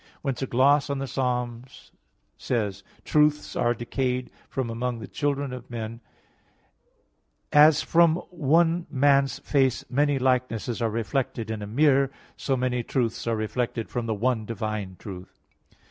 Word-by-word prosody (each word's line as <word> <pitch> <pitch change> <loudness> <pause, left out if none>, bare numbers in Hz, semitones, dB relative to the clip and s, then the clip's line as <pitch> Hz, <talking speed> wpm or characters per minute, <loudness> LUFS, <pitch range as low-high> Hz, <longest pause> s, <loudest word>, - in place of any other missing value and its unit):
Whence 135 -4 -2
a 135 - -1
gloss 140 +4 +3
on 140 - -1
Ps. 135 -2 -5
11:2, 120 - -4 0.2
"Truths 150 0 +2
are 120 0 +1
decayed 125 +1 -2 0.2
from 130 -3 -2
among 120 +1 -2
the 110 - -8
children 140 -2 -2
of 125 -1 -9
men," 115 0 -6
says: 110 - -32
"As 150 0 +7
from 165 -1 +4 0.2
one 170 +1 +2
man's 140 -1 +3
face 135 -3 +1
many 145 +2 +2
likenesses 125 -3 0
are 115 - +1
reflected 115 +1 -2
in 110 -1 -4
a 105 - -5
mirror, 135 +3 +3 0.3
so 135 -2 -1
many 125 -1 0
truths 120 -1 -2
are 115 - +1
reflected 115 +1 -2
from 120 -1 -3
the 110 - 0
one 115 +1 0
divine 110 -4 -4
truth." 95 -3 -10
125 Hz, 145 wpm, -26 LUFS, 115-140 Hz, 0.3 s, As